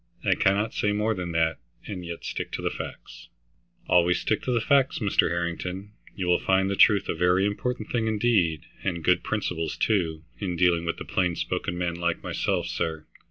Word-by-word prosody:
I -, -, +4 dB
cannot 100 Hz, +3 st, +1 dB
say 105 Hz, 0 st, +1 dB
more 105 Hz, +2 st, +1 dB
than 90 Hz, -4 st, -4 dB
that 80 Hz, 0 st, +1 dB, 0.3 s
and 90 Hz, -3 st, -6 dB
yet 85 Hz, -1 st, -7 dB
stick -, -, -4 dB
to -, -, -2 dB
facts." -, -, -8 dB, 0.6 s
"Always 90 Hz, 0 st, +4 dB
stick 110 Hz, -, 0 dB
to 125 Hz, -2 st, +1 dB
facts, 135 Hz, +3 st, +3 dB
Mr. 105 Hz, -5 st, +2 dB
Harrington. 90 Hz, +3 st, -3 dB, 0.2 s
You 95 Hz, -, -3 dB
will 90 Hz, 0 st, +3 dB
find 95 Hz, +1 st, +2 dB
the -, -, 0 dB
truth 105 Hz, -2 st, +5 dB
a -, -, 0 dB
very 90 Hz, +3 st, +3 dB
important 110 Hz, +2 st, -2 dB
thing 115 Hz, -2 st, 0 dB
indeed, 105 Hz, -8 st, +2 dB, 0.2 s
and 85 Hz, -4 st, -2 dB
good 90 Hz, +3 st, +3 dB
principles 90 Hz, -7 st, -2 dB
too, 80 Hz, -7 st, 0 dB, 0.2 s
in 95 Hz, -4 st, -2 dB
dealing 85 Hz, -1 st, +3 dB
with 85 Hz, -, -2 dB
plain 90 Hz, -2 st, +1 dB
spoken 90 Hz, -, -2 dB
men 90 Hz, -1 st, -1 dB
like 85 Hz, 0 st, -2 dB
myself, -, -, -1 dB
sir. 80 Hz, -1 st, -3 dB
90 Hz, 180 wpm, -26 LUFS, 85-105 Hz, 0.6 s, truth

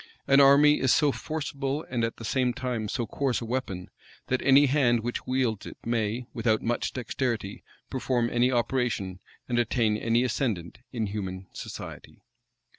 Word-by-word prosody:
An 140 Hz, 0 st, +6 dB
army 140 Hz, +2 st, +7 dB
is 130 Hz, -1 st, +3 dB
so 150 Hz, -1 st, +4 dB
forcible, 145 Hz, -1 st, -3 dB
and 120 Hz, -2 st, -1 dB
at 115 Hz, -, -2 dB
the 115 Hz, -, -8 dB
same 125 Hz, +2 st, +1 dB
time 120 Hz, -4 st, -2 dB
so 120 Hz, +1 st, -1 dB
coarse 130 Hz, +3 st, -1 dB
a 115 Hz, -, -6 dB
weapon, 110 Hz, -7 st, -4 dB, 0.4 s
that 130 Hz, -, +1 dB
any 140 Hz, +2 st, +6 dB
hand 130 Hz, -4 st, +3 dB
which 120 Hz, +2 st, -4 dB
wields 125 Hz, -5 st, 0 dB
it, -, -, -9 dB
may, 115 Hz, +1 st, -1 dB
without 110 Hz, -2 st, +1 dB
much 120 Hz, +1 st, -1 dB
dexterity, 120 Hz, -5 st, -3 dB, 0.3 s
perform 125 Hz, -2 st, 0 dB
any 120 Hz, +2 st, +2 dB
operation, 120 Hz, -6 st, -1 dB, 0.3 s
and 120 Hz, -1 st, +1 dB
attain 115 Hz, -2 st, +1 dB
any 115 Hz, +2 st, +2 dB
ascendant, 110 Hz, -, -2 dB
in 115 Hz, -4 st, -1 dB
human 95 Hz, -2 st, -5 dB
society. -, -, -9 dB
120 Hz, 160 wpm, -27 LUFS, 110-130 Hz, 0.4 s, army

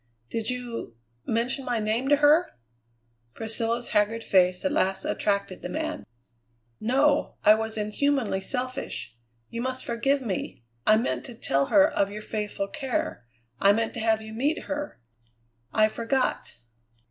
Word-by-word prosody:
"Did 225 Hz, 0 st, -1 dB
you 245 Hz, -, -4 dB, 0.3 s
mention 240 Hz, +4 st, 0 dB
my 245 Hz, -2 st, -1 dB
name 220 Hz, +4 st, 0 dB
to 290 Hz, -, +7 dB
her?" 295 Hz, -, +4 dB, 0.8 s
Priscilla's 230 Hz, +2 st, -1 dB
haggard 220 Hz, +2 st, +1 dB
face 180 Hz, +1 st, +3 dB
at 285 Hz, -, +2 dB
last 190 Hz, -11 st, 0 dB
attracted 200 Hz, -2 st, -1 dB
the -, -, -5 dB
man. 315 Hz, 0 st, -4 dB, 0.7 s
"No. 275 Hz, +6 st, +2 dB
I 210 Hz, -, +8 dB
was 220 Hz, 0 st, -2 dB
inhumanly 215 Hz, -1 st, 0 dB
selfish. 250 Hz, -, -4 dB, 0.4 s
You 230 Hz, -, -3 dB
must 260 Hz, +1 st, -3 dB
forgive 270 Hz, +4 st, +1 dB
me. 190 Hz, -, -4 dB, 0.2 s
I 215 Hz, -, +7 dB
meant 230 Hz, -, -1 dB
to 245 Hz, -, -8 dB
tell 140 Hz, -10 st, +1 dB
her 290 Hz, 0 st, +6 dB
of 200 Hz, -10 st, 0 dB
your 210 Hz, +1 st, -7 dB
faithful 210 Hz, -2 st, -3 dB
care; 270 Hz, -, -3 dB, 0.3 s
I 200 Hz, +1 st, +6 dB
meant 225 Hz, +1 st, -1 dB
to -, -, -5 dB
have 220 Hz, -1 st, +1 dB
you 220 Hz, 0 st, -9 dB
meet 280 Hz, +8 st, 0 dB
her. 295 Hz, 0 st, -5 dB, 0.7 s
I 215 Hz, 0 st, +4 dB
forgot." 230 Hz, +4 st, -1 dB
230 Hz, 145 wpm, -26 LUFS, 210-265 Hz, 0.8 s, I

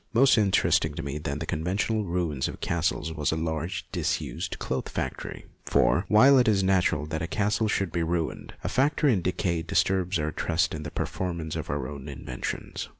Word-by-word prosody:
More 130 Hz, +4 st, +6 dB
interesting 105 Hz, -4 st, +3 dB
to -, -, -4 dB
me 70 Hz, +2 st, -4 dB
than 75 Hz, -2 st, -3 dB
the -, -, -4 dB
conven 85 Hz, +5 st, -2 dB
tional 110 Hz, +1 st, 0 dB
ruins 85 Hz, -6 st, -1 dB
of -, -, -7 dB
castles 85 Hz, -1 st, -1 dB
was 75 Hz, -3 st, 0 dB
a -, -, 0 dB
large 80 Hz, +2 st, -3 dB
disused -, -, -2 dB
cloth 65 Hz, -, -3 dB
factory, -, -, -4 dB, 0.2 s
for, 85 Hz, +10 st, +2 dB
while 130 Hz, +7 st, +7 dB
it 125 Hz, -, +3 dB
is 100 Hz, -3 st, +3 dB
natural 95 Hz, -5 st, +2 dB
that 80 Hz, +1 st, -4 dB
a 85 Hz, -, -2 dB
castle 105 Hz, +4 st, +1 dB
should 95 Hz, -4 st, 0 dB
be 85 Hz, -, -1 dB
ruined, 85 Hz, -1 st, -2 dB
a -, -, -2 dB
factory 145 Hz, 0 st, +3 dB
in 95 Hz, -, +1 dB
decay 85 Hz, -1 st, 0 dB
disturbs 90 Hz, +2 st, +1 dB
our 75 Hz, 0 st, -1 dB
trust 85 Hz, +3 st, 0 dB
in 75 Hz, -, -4 dB
the 75 Hz, -, -5 dB
permanence 85 Hz, -1 st, -3 dB
of -, -, -4 dB
our 70 Hz, -3 st, -2 dB
own 70 Hz, 0 st, -7 dB
inventions. 65 Hz, -2 st, -5 dB
85 Hz, 195 wpm, -27 LUFS, 75-95 Hz, 0.2 s, while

